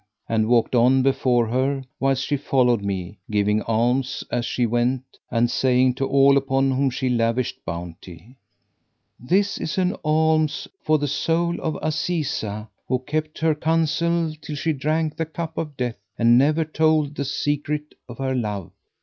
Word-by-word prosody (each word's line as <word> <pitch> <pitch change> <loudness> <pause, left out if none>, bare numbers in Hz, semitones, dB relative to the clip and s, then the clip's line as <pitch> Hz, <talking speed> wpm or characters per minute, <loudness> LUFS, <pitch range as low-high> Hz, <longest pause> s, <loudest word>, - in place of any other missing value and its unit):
and 110 -1 +1
walked 120 0 +2
on 130 +2 +4
before 130 -3 +2
her, 130 +4 0 0.2
whilst 135 -1 +1
she 145 - 0
followed 125 -5 +2
me, 95 -1 -4
giving 105 0 +1
alms 125 +4 0
as 120 0 0
she 125 - 0
went 120 +3 0 0.3
and 120 0 +1
saying 130 0 +3
to 135 +1 -2
all 140 0 +5
upon 135 0 +1
whom 135 +1 +1
she 130 +1 -2
lavisht 120 0 0
bounty, 85 +5 -8 0.8
"This 195 +11 +1
is 160 - -3
an 185 0 +1
alms 155 0 +1
for 155 0 +2
the 145 0 -2
soul 170 +4 0
of 160 -2 -2
Azizah, 150 -10 -2 0.2
who 130 - +1
kept 155 +4 -4
her 160 -1 +2
counsel 165 +1 0
till 150 - -6
she 160 +2 0
drank 155 +2 -1
the 165 - -1
cup 160 0 -5
of 150 -4 -5
death 125 -2 -2 0.2
and 120 0 +5
never 150 +5 +3
told 155 -1 +1
the 140 - -3
secret 145 +2 -2 0.2
of 120 - -9
her 135 -1 -1
love." 105 -8 -3
135 Hz, 160 wpm, -23 LUFS, 120-155 Hz, 0.8 s, all